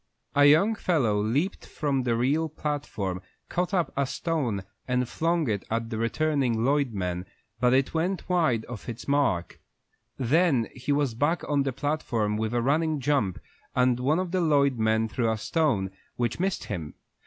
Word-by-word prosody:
A 145 Hz, 0 st, +5 dB
young 160 Hz, +10 st, +6 dB
fellow 135 Hz, -, +1 dB
leaped 140 Hz, -, -1 dB
from 140 Hz, -3 st, -1 dB
the 120 Hz, -2 st, 0 dB
rear 140 Hz, +7 st, +1 dB
platform, 135 Hz, -12 st, -3 dB, 0.3 s
caught 180 Hz, +2 st, -1 dB
up 180 Hz, -4 st, 0 dB
a 140 Hz, -1 st, +1 dB
stone 130 Hz, -, -2 dB, 0.2 s
and 125 Hz, -1 st, +1 dB
flung 165 Hz, +2 st, 0 dB
it 105 Hz, -3 st, -1 dB
at 115 Hz, +1 st, -2 dB
the 110 Hz, -, -2 dB
returning 125 Hz, -2 st, +1 dB
Lloyd 140 Hz, -2 st, +2 dB
men, 90 Hz, -3 st, -3 dB, 0.3 s
but 125 Hz, 0 st, +3 dB
it 135 Hz, 0 st, +1 dB
went 175 Hz, +4 st, -1 dB
wide 155 Hz, -11 st, +2 dB
of 120 Hz, -1 st, -8 dB
its 120 Hz, +2 st, -7 dB
mark. 140 Hz, -12 st, 0 dB, 0.6 s
Then 135 Hz, -1 st, +2 dB
he 130 Hz, +2 st, -3 dB
was 140 Hz, -4 st, +1 dB
back 145 Hz, +8 st, 0 dB
on 145 Hz, -1 st, +2 dB
the 135 Hz, -1 st, 0 dB
platform 120 Hz, -7 st, -1 dB
with 110 Hz, +2 st, -2 dB
a 120 Hz, -, +1 dB
running 155 Hz, +3 st, +1 dB
jump, 130 Hz, -9 st, +1 dB, 0.4 s
and 125 Hz, -1 st, +3 dB
one 140 Hz, +5 st, +2 dB
of 185 Hz, -1 st, -2 dB
the 185 Hz, -1 st, +1 dB
Lloyd 140 Hz, -6 st, +3 dB
men 110 Hz, 0 st, +2 dB
threw 115 Hz, +1 st, 0 dB
a 110 Hz, -, -1 dB
stone, 110 Hz, -, 0 dB, 0.2 s
which 120 Hz, +3 st, -1 dB
missed 190 Hz, +1 st, -1 dB
him. 75 Hz, -4 st, -5 dB
135 Hz, 175 wpm, -27 LUFS, 115-155 Hz, 0.6 s, young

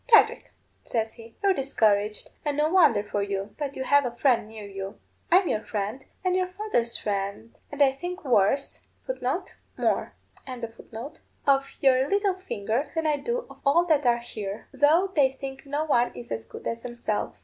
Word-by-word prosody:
'Patrick,' 460 Hz, -3 st, +5 dB, 0.3 s
says 225 Hz, -2 st, -2 dB
he, 230 Hz, 0 st, -14 dB
'you're 395 Hz, -1 st, +5 dB
discouraged, 215 Hz, -, +1 dB
and 290 Hz, -1 st, -1 dB
no 305 Hz, +1 st, +2 dB
wonder 315 Hz, -, +5 dB
for 205 Hz, 0 st, -2 dB
you. 200 Hz, 0 st, -3 dB
But 285 Hz, -2 st, -3 dB
you 265 Hz, -, -3 dB
have 285 Hz, +2 st, +4 dB
a 240 Hz, -2 st, -3 dB
friend 240 Hz, -4 st, +3 dB
near 220 Hz, -1 st, -9 dB
you. 195 Hz, 0 st, -6 dB, 0.3 s
I'm 365 Hz, +1 st, +6 dB
your 215 Hz, -, +1 dB
friend, 210 Hz, +5 st, -3 dB, 0.2 s
and 365 Hz, 0 st, +2 dB
your 370 Hz, 0 st, +1 dB
father's 365 Hz, -, -1 dB
friend, 200 Hz, +2 st, -3 dB, 0.2 s
and 290 Hz, 0 st, +3 dB
I 270 Hz, -, +5 dB
think 355 Hz, +6 st, -6 dB
worse 250 Hz, +2 st, +2 dB, 0.3 s
of -, -, -3 dB, 0.6 s
your -, -, 0 dB, 2.0 s
little 400 Hz, -1 st, +2 dB
finger 275 Hz, -, -2 dB
than 325 Hz, 0 st, 0 dB
I 300 Hz, -1 st, +2 dB
do 475 Hz, -, -2 dB
of -, -, -14 dB
all 320 Hz, +5 st, +4 dB
that 300 Hz, -6 st, +3 dB
are 240 Hz, 0 st, +5 dB
here, 215 Hz, -3 st, -6 dB
though 310 Hz, +8 st, +4 dB
they 270 Hz, -3 st, +4 dB
think 270 Hz, 0 st, -8 dB
no 290 Hz, +2 st, -1 dB
one 245 Hz, -5 st, +3 dB
is 120 Hz, -1 st, -9 dB
as 110 Hz, 0 st, -3 dB
good -, -, -11 dB
as 230 Hz, 0 st, -2 dB
themselves. 240 Hz, -3 st, -3 dB
265 Hz, 170 wpm, -26 LUFS, 215-315 Hz, 2.0 s, I'm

